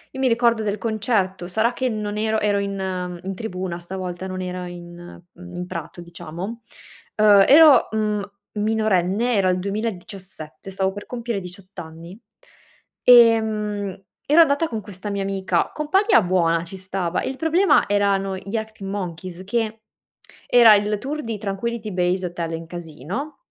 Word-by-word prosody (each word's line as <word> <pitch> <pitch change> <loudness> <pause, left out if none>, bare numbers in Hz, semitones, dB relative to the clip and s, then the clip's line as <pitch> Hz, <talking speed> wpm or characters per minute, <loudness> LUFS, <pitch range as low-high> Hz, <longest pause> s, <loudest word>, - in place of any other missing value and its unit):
Io 265 - -4
mi 260 - +3
ricordo 235 -1 +2
del 205 0 -1
concerto, 205 -5 -1
sarà 220 +5 +1
che 260 0 -1
non 210 -2 -3
ero 220 0 0
ero 205 -1 +1
in, 200 -1 -3
uhm, 180 -2 -4
in 195 0 -4
tribuna 185 -4 -4
stavolta, 185 +1 -6
non 185 0 -5
era 180 0 -4
in, 175 0 -11
mhmm, 180 0 -12
in 180 0 -4
prato 170 -1 -7
diciamo. 175 +6 -7 0.6
Uhm, 205 -2 +7
ero, 305 0 +7
mhmm, 215 -1 0 0.3
minorenne, 215 +1 +1
era 195 -2 +3
il 180 0 +1
2017, 195 -4 -5
stavo 190 0 -1
per 205 - -8
compiere 235 -4 -4
18 185 +2 -12
anni. 165 +4 -10 0.9
Ehm, 215 -5 +4 0.2
ero 300 +4 +4
andata 315 +1 +3
con 225 - -3
questa 205 0 -7
mia 200 -1 -2
amica, 190 -3 0
compagna 345 - +3
buona 170 -3 +1
ci 190 +3 -9
stava, 185 -2 -2
il 265 - -3
problema 335 +5 +3
erano 195 -1 +1
gli 195 +3 -7
Arctic 220 -3 -5
Monkeys, 185 -2 -5
che 220 +2 -2 0.7
era 230 -3 +8
il 210 +1 0
tour 290 +7 -4
di 225 -2 -4
Tranquility 215 +2 -4
Base 180 +1 0
Hotel 170 -1 -4
and 165 0 -6
Casino 175 - -6
200 Hz, 155 wpm, -22 LUFS, 180-220 Hz, 0.9 s, era